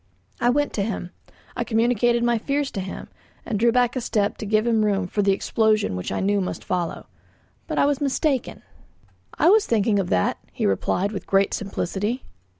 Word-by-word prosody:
I 240 - +3
went 290 +3 +1
to 205 - -1
him. 190 -4 -4 0.4
I - - -1
communicated 235 +1 +2
my 240 -1 +2
fears 280 +3 -1
to - - -4
him, 190 0 -7 0.4
and 215 -5 -2
drew 235 +1 +4
back 245 0 +2
a 255 - -1
step 205 -3 0
to 215 - -6
give 215 +1 +2
him 225 -2 +2
room 200 -2 +1
for 205 +3 -1
the 200 0 +3
explosion 215 - +1
which 90 - -4
I - - -1
knew 200 +1 +1
must 185 - -4
follow. 175 -2 -3 0.6
But - - -3
I - - +4
was 285 0 0
mistaken. 275 -1 -1 0.7
"I - - +5
was 430 0 +4
thinking 215 -2 +2
of 185 - -2
that," 90 - +1
he - - -2
replied 180 - 0
with 200 - -6
great 195 0 +2
simplicity. 205 +4 -2
215 Hz, 195 wpm, -23 LUFS, 195-240 Hz, 0.7 s, I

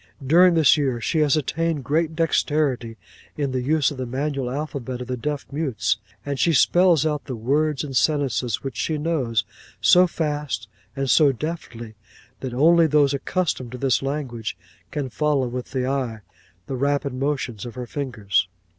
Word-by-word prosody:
'"During 175 +5 +6
the 160 -3 +4
year 135 -5 0
she 155 +7 0
has 150 -1 +3
attained 160 0 -1
great 160 +3 0
dexterity 145 -7 0 0.4
in 140 -3 -1
the 130 -1 -1
use 150 +3 +2
of 145 - -7
the 130 -1 -4
manual 135 0 -2
alphabet 135 -3 -4
of 125 - -5
the 125 +1 -3
deaf 145 +4 -3
mutes; 135 - 0 0.3
and 140 -2 -3
she 170 - +3
spells 175 +2 +4
out 150 -2 -1
the 130 - -5
words 140 +5 0
and 135 -3 -6
sentences 125 -2 +1
which 135 -4 -5
she 155 +7 -1
knows, 135 -9 0 0.3
so 180 +1 +6
fast 150 - -3 0.3
and 135 0 -2
so 145 +4 +6
deftly, 125 -6 -6 0.5
that 130 - -5
only 165 +6 +5
those 145 -2 +3
accustomed 140 -4 -2
to - - -5
this 130 -1 +1
language 130 -8 -4 0.3
can 145 +2 -3
follow 140 0 0
with 125 +1 -5
the 130 -2 -2
eye 130 -5 -2 0.4
the 135 - -4
rapid 140 +1 0
motions 130 -5 -2
of 120 -1 -8
her 125 -1 -5
fingers. 115 -8 -1
140 Hz, 170 wpm, -23 LUFS, 125-150 Hz, 0.5 s, During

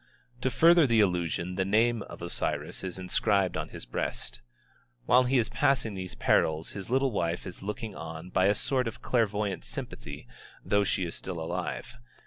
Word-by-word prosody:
To 130 - +2
further 165 +4 +6
the 115 -2 +3
illusion 90 -2 +1
the 95 - +2
name 110 +4 +2
of - - -9
Osiris - - -3
is 95 -1 -4
inscribed 95 +1 +1
on - - -3
his - - -5
breast. - - -3 0.6
While 125 +1 +5
he 130 +2 +3
is 115 -3 +2
passing 130 -6 +1
these 95 -1 -6
perils 80 +1 +2
his 100 0 -7
little 135 +1 +2
wife 85 -4 -1
is 90 - -8
looking 105 +2 -4
on 80 +2 -7
by 95 - +3
a 100 - +4
sort 130 +2 +1
of 115 - -7
clairvoyant 105 -5 0
sympathy, - - -7 0.4
though 100 0 +3
she 95 -2 0
is 85 - -5
still 90 -3 -5
alive. 80 +7 -4
100 Hz, 175 wpm, -29 LUFS, 90-120 Hz, 0.6 s, further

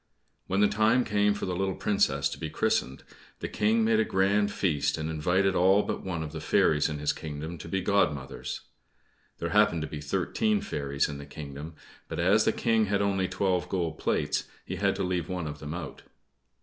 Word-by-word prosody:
When 95 +2 +1
the 105 - +6
time 110 +5 +3
came 105 -1 +2
for 100 - -4
the 90 - -2
little 95 0 -1
Princess 105 -2 +1
to - - -7
be - - -4
christened, 65 +2 0 0.3
the - - -4
King 110 +2 +2
made 110 0 +3
a - - +4
grand 100 +1 +2
feast 75 -9 0
and 80 0 -3
invited 90 +5 +2
all 95 +3 +4
but - - -3
one 85 -4 -3
of 75 - -6
the - - -6
fairies 75 0 +3
in 75 - -3
his 75 0 0
kingdom 80 +2 -6
to 80 - -8
be 95 +2 0
godmothers. 75 -9 -1 0.8
There - - -3
happened 80 -2 +3
to - - -3
be 75 - -6
thirteen 150 - 0
fairies 70 - -1
in 70 -1 -6
the 70 - -9
kingdom; 75 +2 -8 0.3
but - - -5
as 95 +6 +4
the - - +4
King 115 -2 +2
had 100 0 +1
only 95 -2 +1
twelve 90 -2 0
gold 85 -4 -2
plates, - - 0 0.2
he - - -4
had - - +1
to - - -2
leave 90 -1 -1
one 90 -2 -3
of 75 -1 -6
them 75 +2 -5
out. 90 - -7
90 Hz, 205 wpm, -28 LUFS, 75-100 Hz, 0.8 s, the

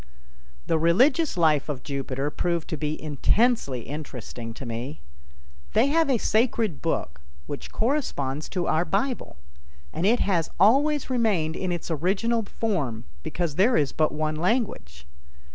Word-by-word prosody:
The 160 - +1
religious 255 - +3
life 155 -4 +3
of 135 -4 -4
Jupiter 140 0 -3
proved 170 0 -1
to - - -1
be 150 0 -3
intensely 155 - +1
interesting 125 -5 -7
to 135 - -8
me. 120 - -5 0.7
They 280 - +4
have 325 -2 +3
a 260 - +3
sacred 220 - +1
book 70 - -2 0.2
which 145 - -7
corresponds 155 - -1
to 180 -3 -2
our 160 +2 +2
Bible, 200 - -2 0.6
and 180 - 0
it 235 +3 +4
has 170 -5 +1
always 275 - +4
remained 200 -10 +1
in 185 -1 -2
its 175 0 -4
original 195 +9 +1
form 170 - -2 0.2
because 170 - -3
there 220 +7 +4
is 145 -3 +1
but 155 -1 +1
one 155 0 -2
language. 160 - -1
165 Hz, 145 wpm, -25 LUFS, 145-225 Hz, 0.7 s, They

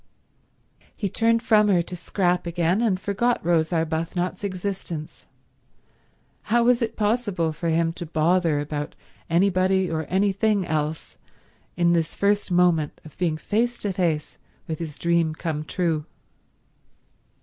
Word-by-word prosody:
He 200 - -2
turned 230 +4 +2
from 215 -2 +4
her 180 -4 +3
to 180 - -7
Scrap 180 0 0
again, 170 +4 +1
and 205 -6 +1
forgot 220 +5 0
Rose 165 -1 +2
Arbuthnot's 165 +3 -1
existence. 185 -5 -5 1.2
How 235 +2 +4
was 245 0 +3
it 230 - -1
possible 205 -7 0
for 165 +2 -3
him 165 0 +1
to 175 -1 -7
bother 165 0 +2
about 145 0 -4 0.3
anybody 185 +1 +2
or 160 -1 -2
anything 200 +2 +1
else 155 0 -3 0.6
in 170 0 +3
this 165 -2 0
first 205 0 +1
moment 175 -4 +2
of 155 - -13
being 165 -4 0
face 235 +8 0
to 200 -2 -3
face 165 -5 -1 0.3
with 160 -1 -4
his 155 -3 -6
dream 170 -2 +1
come 160 -2 -3
true? 160 -2 -1
175 Hz, 135 wpm, -24 LUFS, 160-200 Hz, 1.2 s, from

